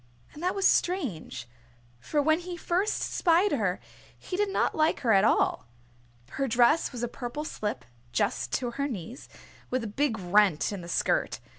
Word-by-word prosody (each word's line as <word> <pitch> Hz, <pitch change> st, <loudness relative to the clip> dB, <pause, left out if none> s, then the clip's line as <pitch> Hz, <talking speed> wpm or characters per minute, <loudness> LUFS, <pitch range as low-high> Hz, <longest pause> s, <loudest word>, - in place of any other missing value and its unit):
And 300 Hz, -, -10 dB
that 360 Hz, +1 st, 0 dB
was 390 Hz, -1 st, +3 dB
strange, 275 Hz, -, -1 dB, 0.5 s
for 290 Hz, -, 0 dB
when 315 Hz, +2 st, +3 dB
he 355 Hz, 0 st, -7 dB
first 365 Hz, +5 st, 0 dB
spied 355 Hz, +3 st, +2 dB
her 205 Hz, -9 st, 0 dB, 0.4 s
he 365 Hz, -, -6 dB
did 410 Hz, +1 st, +1 dB
not 390 Hz, -, +1 dB
like 310 Hz, 0 st, +1 dB
her 230 Hz, -4 st, +3 dB
at 195 Hz, 0 st, +5 dB
all. 220 Hz, -, +2 dB, 0.6 s
Her 275 Hz, -, -1 dB
dress 245 Hz, +7 st, +3 dB
was 245 Hz, -2 st, -6 dB
a -, -, +1 dB
purple 245 Hz, +4 st, -5 dB
slip 210 Hz, -7 st, -4 dB, 0.3 s
just -, -, -1 dB
to 245 Hz, -2 st, -1 dB
her 280 Hz, +4 st, -2 dB
knees, 230 Hz, -, -7 dB, 0.4 s
with 255 Hz, -1 st, -1 dB
a 210 Hz, -2 st, -7 dB
big 275 Hz, -7 st, +2 dB
rent 190 Hz, -3 st, +3 dB
in 200 Hz, -3 st, -5 dB
the 170 Hz, -, -9 dB
skirt. -, -, 0 dB
255 Hz, 175 wpm, -28 LUFS, 210-330 Hz, 0.6 s, at